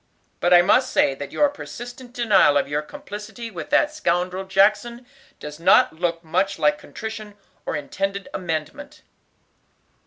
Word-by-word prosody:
But 175 - +1
I 175 0 +8
must 255 +7 +3
say - - +3
that 140 +1 -8
your 295 - +3
persistent 245 -3 -9
denial 210 - +4
of 140 - 0
your 145 +1 -1
complicity 220 - -9
with - - -7
that 300 0 +2
scoundrel 180 - -1
Jackson 210 +5 +1 0.3
does 150 +1 -9
not 165 - +5
look 170 0 -2
much 185 +5 0
like 295 0 +2
contrition, 215 -2 -8 0.3
or - - -1
intended 195 +7 -3
amendment." 235 - -5
195 Hz, 145 wpm, -22 LUFS, 170-240 Hz, 0.3 s, I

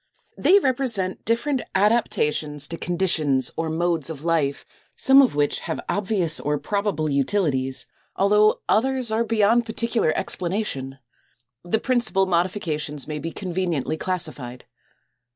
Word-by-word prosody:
They 390 - +5
represent 245 - -1
different 245 +4 0
adaptations 155 -8 +1
to 165 - -4
conditions 160 -7 +1
or 165 0 -2
modes 165 -1 -1
of 155 -2 -7
life, 160 -4 0 0.3
some 270 0 +6
of 255 - +2
which 145 0 +1
have 160 - -4
obvious 190 -6 0
or 150 +1 -1
probable 200 -4 -1
utilities, 140 -3 0 0.3
although 210 +2 +3
others 255 0 +1
are 225 +1 +1
beyond 230 +1 +2
particular 225 -5 0
explanation. 170 -8 -3 0.7
The 175 +5 0
principal 235 -6 +2
modifications 170 -5 -1
may 150 -1 -4
be 165 - -4
conveniently 175 -5 -2
classified. 155 -9 -3
180 Hz, 120 wpm, -23 LUFS, 150-220 Hz, 0.7 s, some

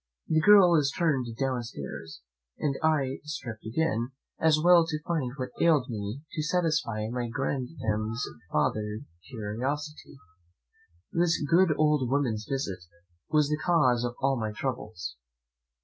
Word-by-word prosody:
The 160 0 +2
girl 195 -1 +7
is 140 -2 +2
turned 150 -8 +1
downstairs, 115 - -4 0.4
and 145 - 0
I 140 -4 +1
stripped 120 -8 -6
again, 120 -1 -1 0.3
as 160 -1 +4
well 175 +1 +6
to 155 -2 -2
find 155 -8 -1
what 130 -1 -3
ailed 150 -6 +3
me 105 +4 -4
as 160 - -27
to 155 - -2
satisfy 155 -10 0
my 120 -1 -2
grandam's 115 -3 -2 0.3
farther 105 +7 0 0.3
curiosity. 135 +7 -4 0.9
This 170 0 +2
good 170 -1 +4
old 150 -5 +2
woman's 125 -6 0
visit 130 -9 -2 0.5
was 150 -2 +3
the 150 0 -1
cause 130 -9 +3
of 120 0 -2
all 135 -1 +2
my 110 -1 -2
troubles. 105 - -5
135 Hz, 135 wpm, -28 LUFS, 115-155 Hz, 0.9 s, girl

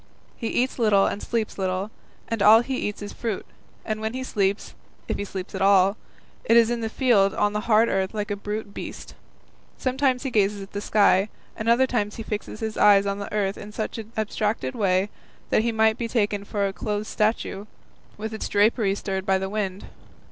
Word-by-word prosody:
He 230 - -4
eats 250 +3 0
little 210 -4 +4
and 205 - -2
sleeps 225 -3 -2
little, 190 +2 -1 0.4
and 230 -2 -2
all 215 +3 +8
he 260 +2 -3
eats 210 -3 -3
is 205 - -7
fruit, 225 -5 -3 0.4
and 215 -1 -3
when 220 +2 -3
he 260 - -3
sleeps, 200 -4 -1 0.3
if - - -2
he - - -1
sleeps 190 -2 -6
at - - -4
all, 195 0 +5 0.5
it 230 - +4
is 230 0 +5
in 240 -1 -1
the 225 - -2
field 220 -6 +3
on 205 0 +1
the 210 - 0
hard 220 +1 +5
earth 190 -2 0
like 210 -1 -3
a - - 0
brute 205 0 -5
beast. - - -8 0.6
Sometimes 260 0 0
he 265 - -3
gazes 205 -2 +2
at 195 - -13
the 205 - -4
sky, 205 -1 +3 0.3
at 220 - -5
other 235 +3 +5
times 210 -5 -1
he 225 - -6
fixes 215 0 -5
his 220 -1 -3
eyes 200 -1 +6
on 200 0 -2
the 200 - -6
earth 200 -2 -1
in 205 - -9
such 215 +2 -4
an 220 0 -9
abstracted 210 -9 -1
way 195 -1 +1 0.4
that - - +4
he 235 +1 0
might 220 0 +2
be 235 - -1
taken 205 -3 0
for 200 -1 -1
a 195 - -4
clothed 210 +1 -3
statue, 215 -2 -1 0.5
with 220 +1 -5
its 220 - -4
drapery 205 -1 +3
stirred 190 -1 -3
by 190 0 +4
the 190 0 -3
wind. 200 -3 -3
210 Hz, 210 wpm, -24 LUFS, 200-225 Hz, 0.6 s, all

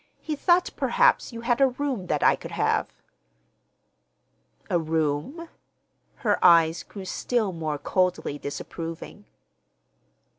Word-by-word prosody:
He 310 - -4
thought 350 +4 +2
perhaps - - +2
you 230 -1 -7
had 240 +2 0
a 270 - +7
room 255 -7 -3
that 150 -3 0
I - - +5
could - - -10
have." - - 0 1.8
"A 175 - +1
room?" 160 - -2 0.8
Her 205 -2 +1
eyes 165 -2 +5
grew 195 -2 -10
still 220 +1 -1
more 155 -3 -3
coldly 180 -1 -1
disapproving. 165 +3 -7
185 Hz, 115 wpm, -25 LUFS, 160-260 Hz, 1.8 s, a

